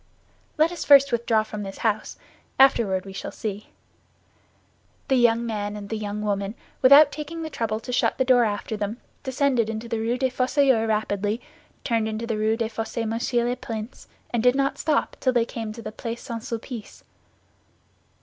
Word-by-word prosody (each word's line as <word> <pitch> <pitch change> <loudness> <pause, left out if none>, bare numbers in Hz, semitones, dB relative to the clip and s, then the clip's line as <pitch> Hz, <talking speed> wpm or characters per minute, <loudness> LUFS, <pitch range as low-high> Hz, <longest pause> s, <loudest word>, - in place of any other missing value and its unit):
"Let 315 +2 +4
us 350 - -5
first 280 -1 +7
withdraw 230 -2 +2
from 215 -1 -7
this 195 -1 -7
house; 215 -1 -1 0.4
afterward 225 -8 +4
we 195 - -9
shall - - -6
see." 210 -1 -5 1.4
The 265 - +4
young 235 -2 +4
woman 210 -3 -3
and 200 -1 -8
the 225 - -2
young 210 0 -4
man, 200 +1 -1 0.3
without 280 +3 +8
taking 315 +2 -6
the 315 - -5
trouble 220 -4 -2
to 250 +2 -6
shut - - +1
the 260 - +2
door 250 -1 +5
after 210 0 -2
them, 210 +2 -3 0.2
descended 260 -3 +1
the 225 +1 -3
Rue 230 +2 0
des 260 0 0
Fossoyeurs 255 -2 +2
rapidly, 210 0 -1 0.4
turned 230 -3 0
into 220 +1 -3
the 225 -2 -2
Rue 220 +1 +1
des 225 -1 -1
Fossés 225 0 -3
Monsieur 235 +2 0
le 245 - 0
Prince, 225 -1 -7 0.2
and 235 - 0
did 250 +2 +4
not 275 0 0
stop 310 -2 0
till 255 - +1
they 240 -2 +3
came 225 -2 -5
to 230 +1 -9
the - - -5
Place 230 +2 -6
St. 230 -3 -5
Sulpice. 230 -1 -7
230 Hz, 180 wpm, -24 LUFS, 215-255 Hz, 1.4 s, without